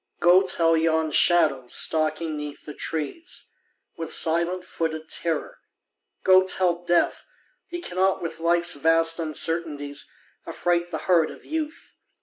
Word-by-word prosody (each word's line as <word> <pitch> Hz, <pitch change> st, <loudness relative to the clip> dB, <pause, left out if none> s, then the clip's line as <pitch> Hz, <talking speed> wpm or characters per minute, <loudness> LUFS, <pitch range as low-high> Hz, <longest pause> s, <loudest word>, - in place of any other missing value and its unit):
Go 175 Hz, +2 st, +6 dB
tell 165 Hz, -3 st, +2 dB
yon 160 Hz, -1 st, +1 dB
shadow 150 Hz, -6 st, +3 dB
stalking 155 Hz, +3 st, 0 dB
'neath 150 Hz, -1 st, -7 dB
the 150 Hz, -, -8 dB
trees 160 Hz, -, -5 dB, 0.5 s
With 165 Hz, -1 st, -6 dB
silent 170 Hz, +3 st, +2 dB
footed 160 Hz, -2 st, -4 dB
terror, 165 Hz, -2 st, -3 dB, 0.6 s
go 185 Hz, 0 st, +6 dB
tell 180 Hz, -2 st, 0 dB
Death 175 Hz, 0 st, +1 dB, 0.4 s
He 350 Hz, 0 st, -6 dB
cannot 190 Hz, -, 0 dB
with 165 Hz, -1 st, -6 dB
Life's 170 Hz, +1 st, +1 dB
vast 165 Hz, +2 st, +2 dB
uncertainties 155 Hz, -2 st, -2 dB, 0.4 s
Affright 175 Hz, 0 st, -1 dB
the -, -, -6 dB
heart 170 Hz, -4 st, +3 dB
of -, -, -13 dB
Youth 315 Hz, +1 st, -5 dB
165 Hz, 130 wpm, -24 LUFS, 160-175 Hz, 0.6 s, Go